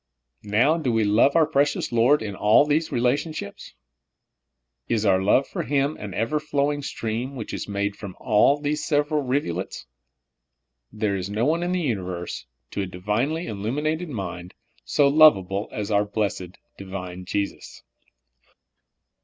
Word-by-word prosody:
Now 130 Hz, +11 st, +3 dB
do 135 Hz, -6 st, 0 dB
we 115 Hz, -1 st, +2 dB
love 105 Hz, +8 st, +3 dB
our 165 Hz, -2 st, +5 dB
precious 145 Hz, -1 st, 0 dB
Lord 120 Hz, +4 st, +3 dB
in 105 Hz, -2 st, -4 dB
all 105 Hz, +8 st, +5 dB
these 155 Hz, +2 st, 0 dB
relationships! 125 Hz, 0 st, -2 dB, 1.1 s
Is 110 Hz, -2 st, 0 dB
our 95 Hz, -2 st, +4 dB
love 105 Hz, +8 st, +3 dB
for -, -, -4 dB
Him 140 Hz, +3 st, 0 dB
an 100 Hz, -4 st, -7 dB
ever 130 Hz, +8 st, 0 dB
flowing 145 Hz, -1 st, -1 dB
stream, 120 Hz, 0 st, -4 dB
which 115 Hz, -4 st, -6 dB
is -, -, -4 dB
made 100 Hz, 0 st, -1 dB
up -, -, -23 dB
from 100 Hz, -4 st, -8 dB
all 125 Hz, +5 st, +4 dB
these 150 Hz, +1 st, -2 dB
vSeveral 150 Hz, -1 st, +1 dB
rivulets? 125 Hz, -10 st, -2 dB, 1.1 s
There 105 Hz, -2 st, -1 dB
is 95 Hz, 0 st, -4 dB
no 105 Hz, +3 st, 0 dB
one 165 Hz, +4 st, +1 dB
in 175 Hz, +1 st, -1 dB
the 180 Hz, -, 0 dB
universe, 90 Hz, -, -4 dB, 0.2 s
to -, -, -2 dB
a 95 Hz, -, -3 dB
divinely 105 Hz, -, -2 dB
illuminated 150 Hz, -, -2 dB
mind, 90 Hz, -, -6 dB, 0.3 s
so 145 Hz, -, +3 dB
lovable 105 Hz, -10 st, +4 dB
as 105 Hz, 0 st, -4 dB
our 105 Hz, 0 st, +3 dB
blessed, 100 Hz, -3 st, -3 dB, 0.2 s
Divine 90 Hz, -2 st, -7 dB
Jesus. 100 Hz, +2 st, -4 dB
115 Hz, 150 wpm, -24 LUFS, 100-145 Hz, 1.1 s, our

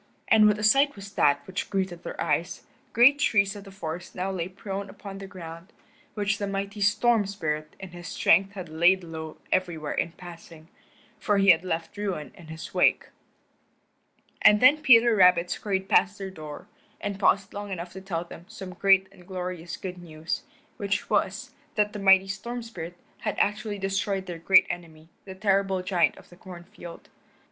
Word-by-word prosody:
And 215 Hz, -1 st, +6 dB
what 210 Hz, 0 st, +3 dB
a 210 Hz, -, -5 dB
sight 275 Hz, +7 st, +4 dB
was 200 Hz, 0 st, -10 dB
that 145 Hz, -5 st, +2 dB
which 190 Hz, 0 st, -5 dB
greeted 190 Hz, -3 st, -2 dB
their -, -, -8 dB
eyes. -, -, -1 dB, 0.3 s
Great 270 Hz, +5 st, +6 dB
trees 200 Hz, -7 st, +2 dB
of 205 Hz, 0 st, -10 dB
the 195 Hz, -, -11 dB
forest 175 Hz, -2 st, -7 dB
now 190 Hz, +1 st, -2 dB
lay 175 Hz, -3 st, -3 dB
prone 195 Hz, +1 st, -6 dB
upon 195 Hz, -1 st, -9 dB
the 195 Hz, -, -8 dB
ground, 170 Hz, 0 st, -10 dB, 0.4 s
which 205 Hz, -1 st, -1 dB
the 200 Hz, -, -2 dB
mighty 200 Hz, +1 st, -4 dB
Storm 210 Hz, +1 st, +3 dB
Spirit 155 Hz, -5 st, -4 dB
in 190 Hz, -, -8 dB
his 175 Hz, -1 st, -10 dB
strength 195 Hz, +5 st, +3 dB
had 185 Hz, -3 st, -7 dB
laid 175 Hz, +4 st, +3 dB
low 160 Hz, -1 st, -8 dB
everywhere 170 Hz, -5 st, -1 dB
in 165 Hz, -, -2 dB
passing, 170 Hz, -2 st, -13 dB, 0.5 s
for 205 Hz, -2 st, +1 dB
he 195 Hz, -1 st, +7 dB
had 170 Hz, 0 st, +2 dB
left 165 Hz, -2 st, -4 dB
ruin 190 Hz, -8 st, -4 dB
in 175 Hz, -4 st, -15 dB
his 160 Hz, 0 st, -9 dB
wake. -, -, +2 dB, 1.3 s
And 210 Hz, 0 st, +6 dB
then 260 Hz, +6 st, +6 dB
Peter 235 Hz, -5 st, +6 dB
Rabbit 180 Hz, -2 st, +5 dB
scurried 195 Hz, -2 st, -2 dB
past 200 Hz, +1 st, +3 dB
their 195 Hz, -1 st, -6 dB
door, 155 Hz, -4 st, -9 dB, 0.3 s
and 200 Hz, -1 st, -4 dB
paused 195 Hz, 0 st, +2 dB
long 205 Hz, 0 st, -6 dB
enough 175 Hz, -1 st, -5 dB
to 190 Hz, -, -8 dB
tell 175 Hz, -3 st, -3 dB
them 170 Hz, 0 st, -12 dB
some 185 Hz, -2 st, -9 dB
great 190 Hz, +1 st, +4 dB
and 180 Hz, -2 st, -18 dB
glorious 180 Hz, -3 st, -5 dB
good 180 Hz, -2 st, -7 dB
news, 160 Hz, -1 st, -5 dB, 0.4 s
which 200 Hz, 0 st, -2 dB
was, -, -, 0 dB, 0.2 s
that 210 Hz, -1 st, +1 dB
the 210 Hz, -, -5 dB
mighty 195 Hz, -1 st, +5 dB
Storm 235 Hz, +5 st, -5 dB
Spirit 175 Hz, -6 st, -8 dB, 0.2 s
had 210 Hz, -, -3 dB
actually 210 Hz, 0 st, 0 dB
destroyed 195 Hz, 0 st, -2 dB
their 175 Hz, -2 st, -7 dB
great 185 Hz, +3 st, +6 dB
enemy, 160 Hz, -2 st, -8 dB, 0.2 s
the 190 Hz, -1 st, -9 dB
terrible 195 Hz, -1 st, +1 dB
giant 180 Hz, -3 st, +1 dB
of -, -, -16 dB
the 175 Hz, -, -16 dB
corn 180 Hz, -2 st, -11 dB
field. 170 Hz, -1 st, -12 dB
190 Hz, 185 wpm, -26 LUFS, 175-200 Hz, 1.3 s, he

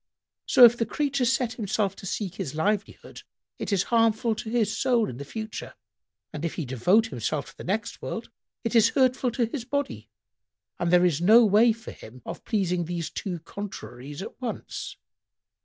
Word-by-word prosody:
So, 245 Hz, -, +9 dB
if 235 Hz, 0 st, +6 dB
the 230 Hz, -, -1 dB
creature 275 Hz, +2 st, 0 dB
set 245 Hz, -1 st, +1 dB
himself 205 Hz, -2 st, -1 dB
to 195 Hz, -, -8 dB
seek 190 Hz, -1 st, -3 dB
his 185 Hz, -7 st, -5 dB
livelihood, 200 Hz, +5 st, -2 dB, 0.4 s
it -, -, -3 dB
is 195 Hz, -2 st, +2 dB
harmful 225 Hz, 0 st, +3 dB
to 220 Hz, +1 st, -6 dB
his 220 Hz, -3 st, +1 dB
soul 245 Hz, -4 st, +2 dB
in 120 Hz, -, -7 dB
the 140 Hz, -, -6 dB
future: 220 Hz, +9 st, -7 dB, 0.6 s
and 150 Hz, -, -6 dB
if 170 Hz, -, -2 dB
he 165 Hz, -, -3 dB
devote 175 Hz, -, +3 dB
himself 140 Hz, +4 st, -3 dB
to -, -, -27 dB
the -, -, -8 dB
next 205 Hz, +5 st, -3 dB
world, -, -, -5 dB, 0.3 s
it 230 Hz, -, -2 dB
is 225 Hz, -1 st, +6 dB
hurtful 255 Hz, -1 st, +3 dB
to 235 Hz, -1 st, +1 dB
his 235 Hz, +2 st, -5 dB
body, 285 Hz, +3 st, -3 dB, 0.7 s
and 175 Hz, -, 0 dB
there 180 Hz, 0 st, +6 dB
is 165 Hz, -3 st, +1 dB
no 220 Hz, +6 st, +7 dB
way 215 Hz, +3 st, +5 dB
for 225 Hz, 0 st, -7 dB
him 120 Hz, +2 st, -13 dB
of -, -, -7 dB
pleasing 180 Hz, -5 st, 0 dB
these 170 Hz, -1 st, -4 dB
two 180 Hz, -5 st, -4 dB
contraries 145 Hz, -6 st, -8 dB
at 215 Hz, -, -10 dB
once." 245 Hz, -3 st, -5 dB
210 Hz, 185 wpm, -26 LUFS, 175-230 Hz, 0.7 s, So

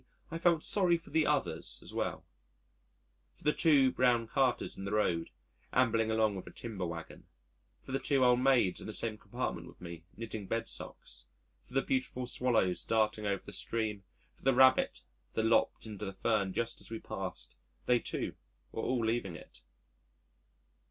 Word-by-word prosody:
e._ -, -, -32 dB, 0.3 s
I 165 Hz, -, -3 dB
felt 170 Hz, -2 st, +3 dB
sorry 180 Hz, -4 st, +4 dB
for 165 Hz, -, -12 dB
the 160 Hz, -1 st, +3 dB
others 150 Hz, -2 st, -1 dB
as -, -, -7 dB
well -, -, -2 dB, 1.1 s
for -, -, -18 dB
the 150 Hz, -, +3 dB
two 140 Hz, -5 st, +5 dB
brown 125 Hz, -3 st, +3 dB
carters 130 Hz, +2 st, 0 dB
in 95 Hz, -, -7 dB
the 100 Hz, -, -4 dB
road 90 Hz, -6 st, +1 dB, 0.4 s
ambling 115 Hz, -3 st, +3 dB
along 110 Hz, -1 st, +2 dB
with 95 Hz, -, -7 dB
a -, -, -8 dB
timber 105 Hz, -6 st, -5 dB
waggon, 85 Hz, -1 st, -8 dB, 0.6 s
for -, -, -9 dB
the 135 Hz, -, 0 dB
two 135 Hz, -2 st, +2 dB
old 125 Hz, 0 st, +5 dB
maids 125 Hz, -8 st, +3 dB
in -, -, -7 dB
the 110 Hz, -, -5 dB
same 110 Hz, 0 st, -1 dB
compartment -, -, -4 dB
with -, -, -15 dB
me 85 Hz, -2 st, -8 dB
knitting 110 Hz, -3 st, -5 dB
bedsocks, 60 Hz, -, -4 dB, 0.4 s
for 125 Hz, -, -13 dB
the 135 Hz, -, +3 dB
beautiful 130 Hz, -1 st, -1 dB
Swallows 120 Hz, -7 st, +2 dB
darting 110 Hz, -1 st, +1 dB
over 100 Hz, -2 st, -1 dB
the -, -, -8 dB
stream, 110 Hz, -3 st, +1 dB, 0.3 s
for -, -, -18 dB
the 135 Hz, -1 st, +3 dB
rabbit 130 Hz, 0 st, +5 dB, 0.3 s
that 110 Hz, -, 0 dB
lopped 115 Hz, 0 st, +2 dB
into 105 Hz, -2 st, -7 dB
the 95 Hz, -, -5 dB
fern 100 Hz, -1 st, +1 dB
just 115 Hz, +4 st, -1 dB
as -, -, -3 dB
we 115 Hz, -, -4 dB
passed 95 Hz, -, -5 dB, 0.3 s
they 125 Hz, -1 st, +4 dB
too -, -, -3 dB, 0.4 s
were 115 Hz, -, -3 dB
all 125 Hz, -3 st, 0 dB
leaving 110 Hz, -6 st, -1 dB
it. -, -, -13 dB
115 Hz, 180 wpm, -32 LUFS, 100-130 Hz, 1.1 s, two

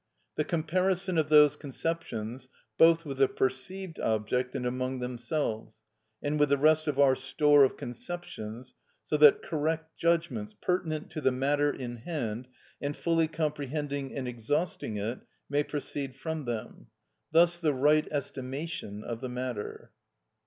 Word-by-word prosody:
The 150 Hz, -, +1 dB
comparison 180 Hz, +3 st, +1 dB
of 155 Hz, -1 st, 0 dB
those 150 Hz, -1 st, +7 dB
conceptions 130 Hz, -5 st, -4 dB, 0.3 s
both 165 Hz, 0 st, +5 dB
with 135 Hz, -2 st, -5 dB
the 135 Hz, -, +6 dB
perceived 155 Hz, +10 st, -3 dB
object 115 Hz, +4 st, 0 dB
and 125 Hz, -, -2 dB
among 130 Hz, +1 st, -1 dB
themselves, 125 Hz, -2 st, -3 dB, 0.5 s
and 150 Hz, +1 st, 0 dB
with 145 Hz, -1 st, +4 dB
the 140 Hz, -, +4 dB
rest 155 Hz, +2 st, +4 dB
of 145 Hz, -2 st, 0 dB
our 140 Hz, -2 st, +6 dB
store 140 Hz, +2 st, +4 dB
of 130 Hz, -, +2 dB
conceptions, 125 Hz, -4 st, -7 dB, 0.3 s
so -, -, -1 dB
that 150 Hz, -1 st, +7 dB
correct 160 Hz, +1 st, -2 dB
judgments, 165 Hz, -11 st, 0 dB
pertinent 160 Hz, -4 st, -1 dB
to 155 Hz, -, -4 dB
the 130 Hz, -, +3 dB
matter 145 Hz, +3 st, +2 dB
in 120 Hz, -3 st, -6 dB
hand, 120 Hz, -4 st, -4 dB, 0.3 s
and 145 Hz, 0 st, -3 dB
fully 165 Hz, -1 st, +2 dB
comprehending 145 Hz, -3 st, -3 dB
and 130 Hz, -2 st, -3 dB
exhausting 125 Hz, 0 st, -2 dB
it, 110 Hz, +5 st, -3 dB, 0.3 s
may 145 Hz, 0 st, +3 dB
proceed 140 Hz, -2 st, -4 dB
from 155 Hz, +2 st, -4 dB
them; 115 Hz, -1 st, -5 dB, 0.4 s
thus 170 Hz, +2 st, +5 dB
the 160 Hz, -3 st, +2 dB
right 150 Hz, +3 st, +3 dB
estimation 135 Hz, -5 st, -4 dB
of 115 Hz, -1 st, -5 dB
the 130 Hz, -, -4 dB
matter. 125 Hz, -3 st, -5 dB
145 Hz, 145 wpm, -29 LUFS, 125-160 Hz, 0.5 s, those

